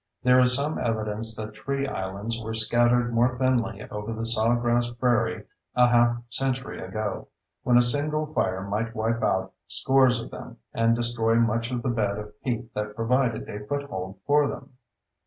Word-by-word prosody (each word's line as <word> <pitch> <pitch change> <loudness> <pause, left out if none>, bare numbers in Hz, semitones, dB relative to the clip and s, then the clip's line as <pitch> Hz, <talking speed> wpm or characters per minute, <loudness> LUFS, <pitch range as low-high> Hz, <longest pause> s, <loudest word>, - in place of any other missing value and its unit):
There 125 0 +5
is 125 0 +5
some 145 +3 -1
evidence 110 -1 -1
that 110 0 -6
tree 140 +5 -3
islands 100 +2 -4
were 110 0 -4
scattered 120 +2 +2
more 120 +2 +2
thinly 120 -5 0
over 105 +2 -4
the 115 0 -4
sawgrass 120 +1 +2
prairie 120 -1 0 0.3
a 125 0 +5
half 120 0 +4
century 130 +1 -2
ago, 100 +2 -4 0.3
when 120 -1 +4
a 120 - +6
single 150 +5 +1
fire 95 -8 0
might 110 +3 -2
wipe 115 +1 -1
out 95 0 0
scores 130 +9 +3
of 115 - -8
them - - -9 0.2
and 115 0 +3
destroy 120 -1 +1
much 115 0 +1
of 125 -2 -3
the 130 - 0
bed 105 -4 0
of 105 0 -9
peat 120 -2 -3
that 105 0 -4
provided 115 +1 0
a 105 0 -6
foothold 100 -10 -4
for 145 0 +4
them. 135 0 -7
115 Hz, 170 wpm, -26 LUFS, 110-125 Hz, 0.3 s, a